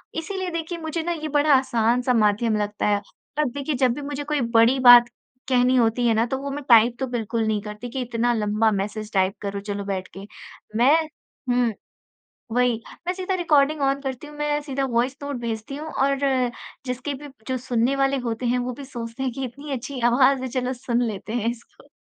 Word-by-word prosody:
इसीलिए 375 Hz, +3 st, -3 dB
देखिए 335 Hz, +1 st, -4 dB
मुझे 320 Hz, 0 st, -3 dB
ना 345 Hz, -, -1 dB
ये 310 Hz, -2 st, -3 dB
बड़ा 295 Hz, 0 st, +3 dB
आसान-सा 245 Hz, -1 st, +2 dB
माध्यम 215 Hz, 0 st, +2 dB
लगता 210 Hz, 0 st, -2 dB
है। 205 Hz, 0 st, +2 dB, 0.4 s
अब 300 Hz, -, +2 dB
देखिए 285 Hz, +2 st, -3 dB
जब 255 Hz, -1 st, +3 dB
भी 290 Hz, -, -6 dB
मुझे 290 Hz, 0 st, -4 dB
कोई 295 Hz, -1 st, -1 dB
बड़ी 230 Hz, +4 st, +5 dB
बात 245 Hz, -1 st, +9 dB, 0.4 s
कहनी 250 Hz, 0 st, +3 dB
होती 240 Hz, 0 st, +2 dB
है 230 Hz, -, +4 dB
ना, 225 Hz, +1 st, +2 dB
तो 265 Hz, +2 st, -2 dB
वो 280 Hz, +1 st, -5 dB
मैं 290 Hz, +1 st, -5 dB
टाइप 235 Hz, 0 st, +6 dB
तो 265 Hz, -, -1 dB
बिल्कुल 230 Hz, -2 st, -2 dB
नहीं 215 Hz, -1 st, 0 dB
करती, 210 Hz, +3 st, -7 dB
कि 260 Hz, +2 st, -4 dB
इतना 240 Hz, 0 st, 0 dB
लंबा 215 Hz, 0 st, +1 dB
मैसेज 210 Hz, +2 st, -3 dB
टाइप 190 Hz, 0 st, +2 dB
करो 200 Hz, 0 st, -3 dB
चलो 205 Hz, 0 st, -4 dB
बैठ 190 Hz, -2 st, -3 dB
के, 195 Hz, -, -9 dB, 0.5 s
मैं 255 Hz, +7 st, +5 dB, 0.5 s
हुँ। 245 Hz, -2 st, +2 dB, 0.8 s
वही, 245 Hz, -1 st, +2 dB, 0.3 s
मैं 360 Hz, -, +1 dB
सीधा 375 Hz, 0 st, -2 dB
रिकॉर्डिंग 310 Hz, -4 st, +2 dB
ऑन 275 Hz, 0 st, +1 dB
करती 270 Hz, +1 st, -5 dB
हूँ, 295 Hz, -, -12 dB
मैं 295 Hz, 0 st, 0 dB
सीधा 275 Hz, -2 st, -2 dB
वॉइस 250 Hz, +3 st, +1 dB
नोट 285 Hz, -1 st, -4 dB
भेजती 230 Hz, +3 st, -4 dB
हूँ 310 Hz, +2 st, -6 dB
और 275 Hz, 0 st, +1 dB, 0.7 s
जिसके 255 Hz, +3 st, -3 dB
भी 290 Hz, +2 st, -9 dB, 0.2 s
जो 260 Hz, -, 0 dB
सुनने 245 Hz, +1 st, 0 dB
वाले 275 Hz, 0 st, +2 dB
होते 230 Hz, +2 st, -2 dB
हैं, 245 Hz, +1 st, +2 dB
वो 250 Hz, 0 st, -2 dB
भी 275 Hz, +3 st, -9 dB
सोचते 235 Hz, -1 st, -7 dB
हैं 260 Hz, -2 st, -1 dB
कि 270 Hz, +3 st, -4 dB
इतनी 280 Hz, +4 st, -7 dB
अच्छी 260 Hz, +1 st, -4 dB
आवाज़ 265 Hz, +1 st, +4 dB
है, 260 Hz, -, -3 dB
चलो 250 Hz, 0 st, -2 dB
सुन 245 Hz, -1 st, -1 dB
लेते 215 Hz, 0 st, -5 dB
हैं 230 Hz, -1 st, 0 dB
इसको। 235 Hz, 0 st, -12 dB
250 Hz, 205 wpm, -23 LUFS, 230-280 Hz, 0.8 s, बात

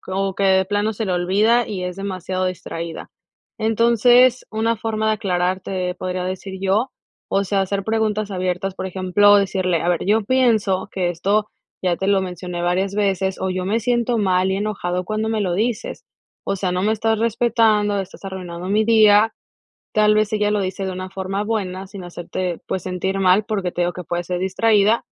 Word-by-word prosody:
como 195 Hz, 0 st, -2 dB
que -, -, -3 dB
de 190 Hz, -1 st, +4 dB
plano 205 Hz, +2 st, 0 dB
se 220 Hz, +1 st, -3 dB
le 190 Hz, -, -1 dB
olvida 205 Hz, +7 st, +2 dB
y 185 Hz, -4 st, -4 dB
es 180 Hz, -1 st, -4 dB
demasiado 185 Hz, -1 st, -3 dB
distraída, 170 Hz, -2 st, -6 dB, 0.5 s
entonces, 235 Hz, +3 st, +4 dB
una 225 Hz, +1 st, 0 dB
forma 220 Hz, 0 st, -2 dB
de -, -, +3 dB
aclararte, 185 Hz, -2 st, -1 dB
podría 185 Hz, 0 st, -4 dB
decir 190 Hz, +1 st, -5 dB
yo, 205 Hz, +7 st, +1 dB, 0.4 s
o 195 Hz, 0 st, +1 dB
sea, 195 Hz, 0 st, 0 dB
hacer 195 Hz, 0 st, -2 dB
preguntas 215 Hz, -1 st, 0 dB
abiertas, 185 Hz, 0 st, -2 dB
por 190 Hz, -, -5 dB
ejemplo, 190 Hz, +2 st, +4 dB
decirle: 185 Hz, -3 st, +1 dB
"A 175 Hz, -, -1 dB
ver, 175 Hz, -1 st, 0 dB
yo 215 Hz, +3 st, +2 dB
pienso 220 Hz, -7 st, +2 dB
que 180 Hz, -2 st, 0 dB
esto 200 Hz, +5 st, 0 dB, 0.3 s
ya 175 Hz, -2 st, +1 dB
te 190 Hz, -, -3 dB
lo 200 Hz, -1 st, +3 dB
mencioné 180 Hz, -1 st, -5 dB
varias 190 Hz, +3 st, 0 dB
veces," 190 Hz, -2 st, 0 dB
o 190 Hz, -, -1 dB
"yo 185 Hz, 0 st, -2 dB
me 215 Hz, +5 st, 0 dB
siento 240 Hz, 0 st, +1 dB
mal 185 Hz, -2 st, +2 dB
y 190 Hz, -, 0 dB
enojado 185 Hz, -3 st, -2 dB
cuando 215 Hz, +3 st, -2 dB
me 220 Hz, -1 st, -1 dB
lo 185 Hz, -4 st, 0 dB
dices, 235 Hz, -, -2 dB, 0.4 s
o 195 Hz, -, -1 dB
sea, 185 Hz, -1 st, -1 dB
no 180 Hz, +1 st, -1 dB
me 215 Hz, -, +2 dB
estás 220 Hz, 0 st, 0 dB
respetando, 220 Hz, -3 st, +2 dB
estás 195 Hz, +1 st, -10 dB
arruinando 180 Hz, -2 st, -6 dB
mi 215 Hz, +2 st, +2 dB
día", 220 Hz, -1 st, +5 dB, 0.6 s
tal 210 Hz, 0 st, +4 dB
vez, 215 Hz, 0 st, +1 dB
ella 210 Hz, -1 st, +1 dB
lo 210 Hz, -, +1 dB
dice 190 Hz, +1 st, -3 dB
de 190 Hz, -, -3 dB
una 185 Hz, 0 st, -6 dB
forma 195 Hz, +1 st, -3 dB
buena, 195 Hz, -4 st, -3 dB
sin 190 Hz, -1 st, -9 dB
hacerte, 175 Hz, 0 st, -4 dB
pues, 185 Hz, -, -3 dB
sentir 190 Hz, +1 st, -2 dB
mal, 190 Hz, +3 st, +4 dB
porque 195 Hz, -5 st, -2 dB
te 175 Hz, -, -1 dB
digo 175 Hz, -, 0 dB
que 180 Hz, 0 st, -8 dB
puedes 175 Hz, +1 st, -3 dB
ser 180 Hz, 0 st, -2 dB
distraída, 210 Hz, +3 st, +2 dB
195 Hz, 195 wpm, -21 LUFS, 185-215 Hz, 0.6 s, día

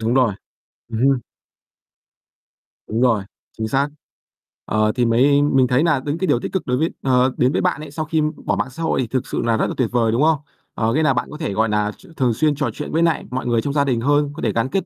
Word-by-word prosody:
Đúng 115 Hz, +2 st, 0 dB
rồi, 125 Hz, -6 st, +3 dB, 0.6 s
ừm 110 Hz, -1 st, -4 dB
hưm. 135 Hz, +1 st, +3 dB, 1.7 s
Đúng 110 Hz, +2 st, -1 dB
rồi, 115 Hz, -6 st, +3 dB, 0.3 s
chính 110 Hz, 0 st, -2 dB
xác. 135 Hz, +5 st, +1 dB, 0.8 s
Ờ, 110 Hz, 0 st, +1 dB
thì 125 Hz, -1 st, +2 dB
mới 135 Hz, +5 st, +4 dB
mình 135 Hz, -3 st, +3 dB
thấy 125 Hz, +4 st, +2 dB
nà 165 Hz, -5 st, +2 dB
những 145 Hz, +2 st, -1 dB
cái 190 Hz, -, -1 dB
điều 120 Hz, -, +3 dB
tích -, -, -5 dB
cực 190 Hz, -, -2 dB
đối 125 Hz, 0 st, +1 dB
với 160 Hz, +4 st, +1 dB
ờ, 130 Hz, -1 st, +3 dB
đến 125 Hz, +1 st, +3 dB
với -, -, 0 dB
bạn 150 Hz, -, 0 dB
ấy, 155 Hz, -2 st, -9 dB
sau 155 Hz, +1 st, -3 dB
khi 160 Hz, +1 st, 0 dB, 0.2 s
bỏ -, -, +1 dB
mạng -, -, -2 dB
xã 160 Hz, +6 st, -7 dB
hội 160 Hz, -, +1 dB
thì 125 Hz, -, -2 dB
thực 130 Hz, +2 st, -2 dB
sự -, -, -2 dB
là 115 Hz, -1 st, +1 dB
rất -, -, +1 dB
là -, -, -3 dB
tuyệt 125 Hz, -4 st, +1 dB
vời, 115 Hz, -2 st, +2 dB
đúng 115 Hz, +4 st, +1 dB
không? 160 Hz, 0 st, +4 dB, 0.4 s
Ờ, 110 Hz, +1 st, 0 dB
nghĩa 155 Hz, -, +2 dB
là -, -, +3 dB
bạn -, -, -2 dB
có 150 Hz, -, -7 dB
thể, 155 Hz, -10 st, -3 dB
gọi 110 Hz, +2 st, +1 dB
nà, 105 Hz, 0 st, 0 dB
ch -, -, -19 dB
thường 125 Hz, -4 st, +2 dB
xuyên 150 Hz, +5 st, +1 dB
trò 140 Hz, -3 st, -1 dB
chuyện -, -, -6 dB
với 165 Hz, -, +1 dB
nại 165 Hz, -2 st, +2 dB
mọi 130 Hz, +1 st, -3 dB
người 120 Hz, -2 st, +2 dB
trong 140 Hz, +4 st, -3 dB
gia 145 Hz, -1 st, +3 dB
đình 125 Hz, -4 st, 0 dB
hơn, 145 Hz, +3 st, +2 dB
có 160 Hz, -, -8 dB
thể -, -, +1 dB
gắn 115 Hz, +3 st, 0 dB
kết 190 Hz, +5 st, -1 dB
130 Hz, 270 wpm, -20 LUFS, 115-150 Hz, 1.7 s, mới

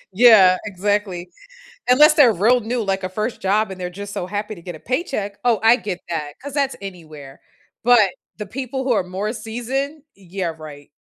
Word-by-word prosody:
Yeah, 200 Hz, -5 st, +7 dB
exactly, 200 Hz, -2 st, -2 dB, 0.6 s
unless 300 Hz, +5 st, +7 dB
they're 285 Hz, -7 st, +6 dB
real 235 Hz, +8 st, +3 dB
new, 235 Hz, +2 st, -2 dB
like, 195 Hz, -2 st, -1 dB
a 185 Hz, -, -2 dB
1st 215 Hz, +5 st, -4 dB
job 210 Hz, +2 st, +1 dB
and 190 Hz, -1 st, -8 dB
they're 180 Hz, -, -3 dB
just 200 Hz, +2 st, -8 dB
so 180 Hz, -, -4 dB
happy 210 Hz, +3 st, -4 dB
to 175 Hz, -, -13 dB
get 175 Hz, 0 st, -7 dB
a -, -, -15 dB
paycheck. 250 Hz, -, -3 dB
Oh, 235 Hz, -3 st, +3 dB
I 225 Hz, +2 st, +6 dB
get 195 Hz, -7 st, -5 dB
that, 150 Hz, -3 st, -4 dB
'cause 285 Hz, +1 st, -7 dB
that's 280 Hz, -2 st, 0 dB
anywhere, 155 Hz, -8 st, -10 dB, 0.4 s
but 230 Hz, -5 st, +5 dB, 0.3 s
the 210 Hz, -, -6 dB
people 260 Hz, +4 st, -5 dB
who 260 Hz, -, +1 dB
are 215 Hz, -, +2 dB
more 190 Hz, +4 st, -3 dB
seasoned, 265 Hz, +6 st, -4 dB
yeah, 185 Hz, -2 st, -5 dB
right. 145 Hz, -2 st, -11 dB
205 Hz, 190 wpm, -21 LUFS, 185-245 Hz, 0.6 s, Yeah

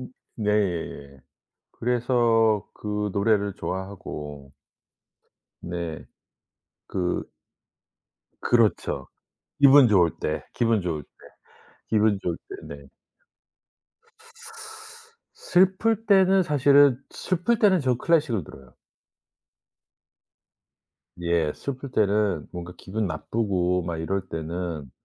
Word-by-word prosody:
음 125 Hz, -, -9 dB, 0.2 s
네. 90 Hz, -, -2 dB, 0.5 s
그래서 115 Hz, -3 st, +1 dB
그 105 Hz, 0 st, -3 dB
노래를 100 Hz, -1 st, +1 dB
좋아하고 75 Hz, -8 st, -6 dB, 1.1 s
네. 85 Hz, -2 st, -5 dB, 0.8 s
그 90 Hz, -2 st, -2 dB, 1.1 s
그렇죠. 115 Hz, -3 st, +1 dB, 0.5 s
기분 140 Hz, -1 st, +8 dB
좋을 90 Hz, -6 st, +4 dB
때, 75 Hz, 0 st, -2 dB
기분 115 Hz, -3 st, +1 dB
좋을 80 Hz, -4 st, -3 dB
때, -, -, -33 dB, 0.8 s
기분 105 Hz, -2 st, +2 dB
좋을 85 Hz, -, -2 dB
때. 390 Hz, +1 st, -9 dB
네. -, -, -16 dB, 2.5 s
슬플 190 Hz, +5 st, +2 dB
때는 190 Hz, -1 st, +5 dB
사실은 145 Hz, -3 st, +5 dB
슬플 185 Hz, +6 st, -1 dB
때는 195 Hz, -5 st, +4 dB
저 130 Hz, -3 st, +1 dB
클래식을 145 Hz, -, +1 dB
들어요. 65 Hz, -3 st, -15 dB, 2.5 s
예. 85 Hz, -3 st, +1 dB
슬플 140 Hz, 0 st, -6 dB
때는 100 Hz, -, +1 dB
뭔가 90 Hz, 0 st, -7 dB
기분 105 Hz, +3 st, -3 dB
나쁘고 90 Hz, +1 st, -1 dB
막 85 Hz, -1 st, -4 dB
이럴 95 Hz, +5 st, -1 dB
때는 80 Hz, -3 st, -5 dB
105 Hz, 170 characters per minute, -25 LUFS, 85-130 Hz, 2.5 s, 기분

